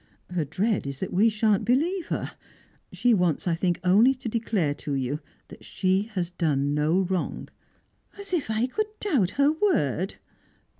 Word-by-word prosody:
Her 175 -4 -1
dread 190 +4 -1
is 140 -1 -6
that 190 - -4
we 210 +5 +4
shan't 215 -2 +1
believe 320 - +1
her. - - -3 0.6
She 230 +7 +2
wants, 180 -5 +1
I 170 - +2
think, 175 +1 0
only 215 +9 +5
to 255 -1 -7
declare 215 -9 0
to 145 0 -5
you 135 +2 -2 0.3
that - - -13
she 190 +3 0
has 175 -2 -2
done 145 -5 0
no 155 +5 +2
wrong." 185 -1 -3 0.7
"As 400 -2 -7
if 320 -10 0
I 220 +2 +1
could 425 +12 -2
doubt 270 - +1
her 280 +1 +5
word!" 205 - 0
190 Hz, 165 wpm, -26 LUFS, 170-245 Hz, 0.7 s, only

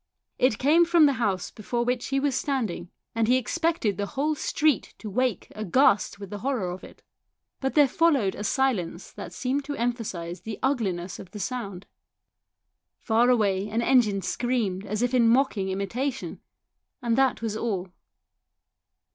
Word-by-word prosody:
It 250 -4 +3
came 310 +6 +5
from 340 -2 +5
the 280 - +4
house 195 -5 0
before 235 +3 -3
which 245 0 -1
he 275 0 0
was 280 0 +1
standing, 225 -12 -2 0.2
and 225 -1 +1
he 250 +2 +5
expected 315 - 0
the 205 - -2
whole 290 +5 -1
street 300 -1 0
to 215 - -7
wake 250 -2 -1
aghast 210 0 +2
with 200 -2 -9
the 205 - -5
horror 230 -6 -1
of 180 - -8
it. - - -14 0.6
But 265 0 -2
there 295 -2 +6
followed 275 - +2
a 205 - -6
silence 210 -8 -1
that - - -8
seemed 270 +2 -2
to 290 0 -4
emphasise 205 -8 -3
the 215 +4 -6
ugliness 195 -10 -1
of 185 - -10
the 210 - -9
sound. 200 -4 -4 1.1
Far 235 +2 +2
away 205 -4 +2
an 225 +3 0
engine 220 -7 +3
screamed 215 -4 -1
as 210 +3 -1
if 245 +1 0
in 235 -2 +5
mocking 230 -6 +2
imitation; 240 +8 -3 0.6
and 235 -1 +1
that 265 -2 +2
was 220 -2 -2
all. 200 -5 -2
230 Hz, 165 wpm, -26 LUFS, 200-265 Hz, 1.1 s, there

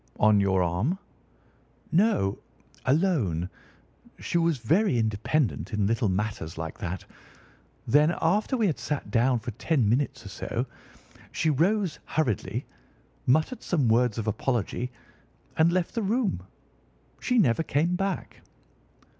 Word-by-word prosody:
"On 105 -1 +5
your 95 -2 +2
arm?" 95 - 0 0.9
"No, 170 - +2 0.5
alone. 125 - +1 0.7
She 170 - -1
was 165 -3 +2
very 150 - +2
independent 110 +5 0
in 105 -1 +1
little 115 +1 +1
matters 95 -4 -3
like 80 0 -5
that. 85 +1 -4 0.8
Then, 150 +7 +4
after 210 +10 +1
we 225 - +2
had 165 -7 0
sat 145 -2 -3
down 125 +1 +3
for 120 +1 -5
ten 125 +2 +1
minutes 125 +1 0
or - - -7
so, 115 +5 -3 0.7
she 160 - +1
rose 180 +4 +1
hurriedly, 135 - -1 0.6
muttered 155 - +2
some 150 -9 +1
words 120 0 +3
of 110 - -2
apology, 120 +2 -1 0.7
and 160 +2 +4
left 180 -1 0
the 230 - -1
room. 210 - 0 0.8
She 250 - 0
never 140 - +4
came 165 +3 +1
back." 195 0 -3
130 Hz, 130 wpm, -27 LUFS, 105-170 Hz, 0.9 s, On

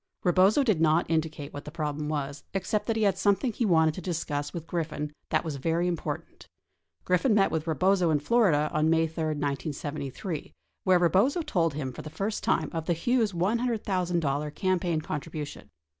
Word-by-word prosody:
Rebozo 190 +9 +4
did 215 -11 +2
not 160 +1 +3
indicate 155 -3 -2
what 145 - -6
the - - -8
problem 150 -1 -3
was 145 -1 -3
except 205 +2 -1
that 225 - +1
he. 220 - +1
had 195 -2 +2
something 205 +5 +2
he 230 +1 0
wanted 160 -3 +4
to 185 - -7
discuss 150 -4 -3
with 170 -3 -6
Griffin 155 -3 -3 0.2
that 155 - +1
was 155 -3 -3
very 165 +5 0
im 175 - +1
portant. - - -6 0.6
Griffin 185 +6 +3
met 195 -2 +4
with 160 0 -2
Rebozo 180 +3 +2
in 155 - +3
Florida 155 -4 +2
on 155 +1 +2
May 165 0 +3
3, 160 0 -4
1973, 145 +1 -3 0.3
where 185 -1 +5
Rebozo 195 - +3
told 165 - 0
him 135 -4 -3
for - - -7
the 155 - -8
first 200 +7 -3
time - - +1
of 160 -1 -3
the 175 - +3
Hughes 225 +5 +1
$100,000 180 - 0
campaign 180 -4 0
contribution. 150 - -6
165 Hz, 180 wpm, -28 LUFS, 150-190 Hz, 0.6 s, where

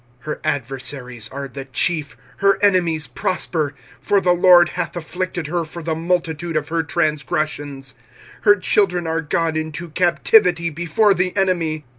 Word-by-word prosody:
25:001:005 - - -28
Her 150 - -4
adversaries 130 -3 -4
are 140 +1 -6
the 135 +1 -8
chief, 150 +3 -1 0.2
her 195 0 +3
enemies 175 -6 +2
prosper; 155 -5 -2 0.3
for 200 - +2
the 180 -2 +2
LORD 175 -1 +6
hath - - -4
afflicted 175 0 -4
her 170 +3 -1
for 165 +1 -8
the 160 0 -1
multitude 165 -1 -2
of 150 0 -3
her 165 0 0
transgressions: 150 -3 -2 0.5
her 205 -1 +6
children 185 -2 +1
are 165 0 -1
gone 160 +1 -1
into 155 +1 -4
captivity 175 0 +3
before 175 +6 +2
the 180 +1 -1
enemy. 165 -6 0
165 Hz, 150 wpm, -20 LUFS, 150-180 Hz, 0.5 s, LORD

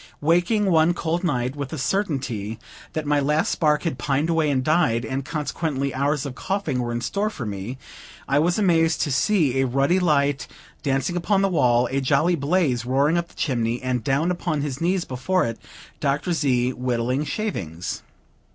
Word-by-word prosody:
Waking, 175 +7 +2
one 165 +1 +4
cold 170 +1 -1
night, 130 -5 -1
with 140 -2 -4
the 160 - -5
certainty 135 - -2 0.4
that 155 -1 -3
my 145 0 +2
last 150 +3 +1
spark 150 -2 +2
had 165 - -2
pined 145 +4 0
away 160 -2 +2
and 130 -2 +1
died, 125 -7 +2
and 130 +4 -3
consequently 150 -2 -2
hours 140 +2 0
of 140 - -5
coughing 185 -4 -2
were 120 -1 -3
in 120 0 -2
store 200 - -1
for 145 - -6
me, 105 +5 -5 0.5
I 140 +1 +3
was 175 +3 +2
amazed 165 -5 +3
to 145 - 0
see 140 -3 +2
a 135 - +1
ruddy 140 +8 +2
light 145 -5 +1 0.3
dancing 145 +5 -1
on 200 -2 +3
the 195 - +3
wall, 125 -7 +3
a 135 +1 0
jolly 140 +6 +2
blaze 145 -5 +1
roaring 135 +6 +2
up 170 0 0
the - - -22
chimney, 120 -5 -1
and, 125 -2 -1
down 140 +8 +1
upon 170 -4 -2
his 140 -1 -4
knees 180 +1 +1
before 130 +9 0
it, 115 -1 -4 0.4
Dr. 145 +6 0
Z., 130 -5 +1
whittling 125 +2 -1
shavings. 95 - -4
145 Hz, 180 wpm, -23 LUFS, 130-170 Hz, 0.5 s, one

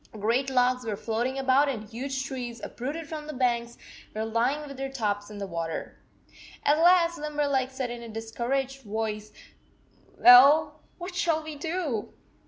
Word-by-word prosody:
Great 230 +6 0
logs 250 -1 +2
were 220 -3 -3
floating 235 +5 -2
about 270 +2 +3
and 230 -6 -3
huge 265 +4 -4
trees, 245 -3 -5
uprooted 290 +6 -5
from 305 -1 -7
the 305 - -5
banks, 240 -2 -1 0.4
were 220 +1 -2
lying 245 +7 0
with 275 - -9
their 270 +1 -4
tops 205 -5 -2
in 210 - -9
the 200 - -4
water. 165 -3 -5 0.7
At 295 +2 +3
last 340 -1 +4
Limberleg 290 -3 0
said 260 -2 -4
in 240 0 -7
a 235 - -9
discouraged 245 +5 -3
voice, 215 -1 -4 0.9
"Well, 275 +6 +7 0.2
what 355 +1 -7
shall 330 -3 0
we 310 -1 -7
do?" 300 - -3
260 Hz, 160 wpm, -27 LUFS, 225-290 Hz, 0.9 s, Well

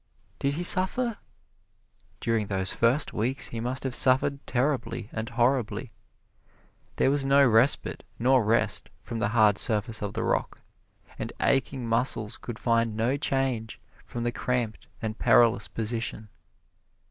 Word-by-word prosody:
Did 140 +1 -1
he 175 - -3
suffer? 205 +6 +4 1.0
During 115 -3 -1
those 95 -2 -2
first 120 +6 +1
weeks 125 +6 -2
he 115 - -6
must 125 +3 -3
have 130 -2 -3
suffered 135 +3 +4
terribly 125 -4 -2
and 110 +1 -5
horribly. 120 -1 -1 1.0
There 135 - +2
was 140 -1 +2
no 140 0 +4
respite 115 +4 +2
nor 130 +1 +3
rest 110 +2 0
from 115 - -6
the 105 - 0
hard 105 -2 +3
surface 110 0 +3
of 105 -1 -4
the - - -3
rock, - - -2 0.6
and - - -5
aching 135 -2 0
muscles 115 -2 0
could 120 -2 -8
find 115 -2 0
no 120 +5 0
change 135 -5 -2 0.2
from 120 - -6
the 120 - -1
cramped 120 -3 -3 0.2
and 110 0 -4
perilous 115 -3 +3
position. 110 -1 -4
120 Hz, 140 wpm, -26 LUFS, 110-135 Hz, 1.0 s, suffer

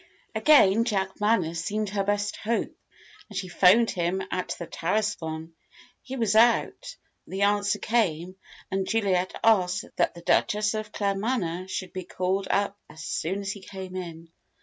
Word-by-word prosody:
Again 230 -8 +5
Jack 195 -5 -2
Manners 170 -6 +1
seemed 210 +2 -2
her 200 0 -1
best 205 0 -1
hope, 230 +2 -2 0.5
and - - -7
she 185 - -3
'phoned 190 +6 +5
him 180 +2 -1
at 185 0 -2
the 170 - -6
Tarascon. 165 -4 -2 0.5
He 265 - -7
was 225 -4 +1
out, 240 - +3 0.3
the 195 +1 -2
answer 205 0 +2
came, 185 -6 0 0.4
and 190 0 -1
Juliet 190 -5 0
asked 185 -5 +3
that - - +1
the 170 - -10
Duchess 210 +4 +2
of 215 -1 -4
Claremanagh 195 -3 -1
should 185 -1 -4
be 185 - -4
called 185 +2 -2
up 200 0 0
as 155 0 -10
soon 190 +7 -2
as 195 -1 -3
he 200 - -8
came 190 -1 -8
in. 165 -2 -7
195 Hz, 155 wpm, -26 LUFS, 180-210 Hz, 0.5 s, Again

